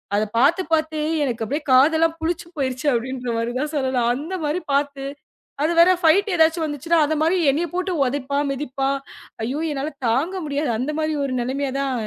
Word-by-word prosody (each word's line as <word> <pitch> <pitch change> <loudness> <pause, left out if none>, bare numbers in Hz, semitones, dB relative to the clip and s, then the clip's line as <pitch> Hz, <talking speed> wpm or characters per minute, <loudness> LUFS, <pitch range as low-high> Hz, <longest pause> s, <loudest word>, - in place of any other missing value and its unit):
அத 210 - +2
பாத்து 295 +9 +4
பாத்து 315 -1 +1 0.2
எனக்குக் 250 +3 -2
காதலா 315 +5 +5
புளிச்சு 335 +1 -2
போயிருச்சு 260 +1 -2
அப்படின்ற 250 +1 -3
மாரி 230 +1 -1
தான் 300 +1 -2
சொல்லலாம். 260 -4 +1
அந்த 315 +8 -5
மாரி 310 +5 -1
பாத்து 280 -1 0 0.6
அது 325 +3 +2
வேற 340 +2 +7
ஃபைட் 380 +6 +4
எதாச்சும் 320 0 +3
வந்துச்சுனா 305 +3 0
அந்த 315 +1 -1
மாதிரி 330 +4 +3 0.2
என்னைய 330 +5 -1
போட்டு 365 +1 -1
உதைப்பான். 280 +2 -1
மிதிப்பான். 275 0 -2 0.5
ஐயோ! 260 +7 -2
என்னால 285 +2 -3 0.2
தாங்க 280 +11 0
முடியாது. 290 0 -1
அந்த 265 +5 -1
மாரி 310 0 0
ஒரு 260 - -3
நிலைமையா 265 +2 -2
தான் 275 -1 -1
285 Hz, 170 wpm, -22 LUFS, 260-320 Hz, 0.6 s, வேற